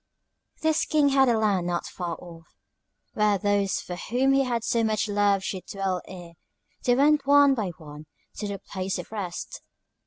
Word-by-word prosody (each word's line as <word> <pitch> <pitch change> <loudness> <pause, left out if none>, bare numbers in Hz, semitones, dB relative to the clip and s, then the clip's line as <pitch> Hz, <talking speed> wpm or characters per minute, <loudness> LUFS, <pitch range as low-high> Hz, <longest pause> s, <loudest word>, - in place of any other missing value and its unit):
"This 315 0 +2
King 300 -2 +3
had 270 -1 +4
a 230 - +3
land, 200 -5 +1
not 175 -1 -2
far 175 -2 -5
off, 165 -2 -13 0.7
where 210 -1 +2
those 205 -1 0
for 180 - -6
whom 255 +9 +1
he 275 0 +3
had 240 -3 -2
so 230 0 +1
much 215 0 0
love 205 -1 +2
should 185 -1 -5
dwell 195 -2 -2
ere 175 -2 -10 0.5
they 245 - +4
went 285 +1 +3
one 285 -1 +6
by 220 -6 -2
one 150 -1 -11 0.3
to 210 - -3
the 200 -1 -4
Place 190 -1 -4
of - - -8
Rest. 190 -5 -5
205 Hz, 180 wpm, -26 LUFS, 185-250 Hz, 0.7 s, one